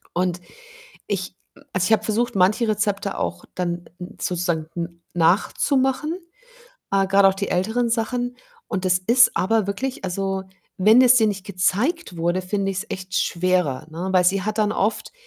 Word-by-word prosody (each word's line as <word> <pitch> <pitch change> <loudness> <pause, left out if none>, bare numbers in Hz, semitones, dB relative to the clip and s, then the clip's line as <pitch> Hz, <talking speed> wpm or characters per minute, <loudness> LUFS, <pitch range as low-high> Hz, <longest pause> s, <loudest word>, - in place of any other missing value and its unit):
Und 180 0 0 0.7
ich 190 -3 -2 0.3
m - - -19
also, 185 -1 +1
ich 220 - +3
habe - - +2
versucht, 225 +2 -1
manche 200 +5 +3
Rezepte 205 -2 -1
auch 85 0 -3
dann 175 -1 -3
n 180 0 -9
sozusagen 170 -3 -1
n 170 0 -6
nachzumachen, 265 - +1 0.8
äh, 195 0 +3
grade 195 0 +5
auch 190 - +1
die 200 +1 -3
älteren 220 +7 0
Sachen 245 +2 -1 0.3
und 190 -3 -3
das 180 -1 +3
ist 235 +7 +4
aber 220 +2 +2
wirklich 255 +6 -3
also, 195 +1 -2 0.4
wenn 215 +6 +6
es 250 -1 +7
dir 220 -3 +4
nicht 200 -2 -4
gezeigt 200 - 0
wurde, 175 +3 0
finde 195 +1 -1
ich's 190 +3 -4
echt 185 -1 -6
schwerer, 175 -7 0
ne? 170 +4 -4
Weil 180 -1 +4
sie 190 +2 +2
hat 215 +3 -3
dann 210 -1 +2
oft 215 +2 -1
195 Hz, 170 wpm, -22 LUFS, 180-220 Hz, 0.8 s, es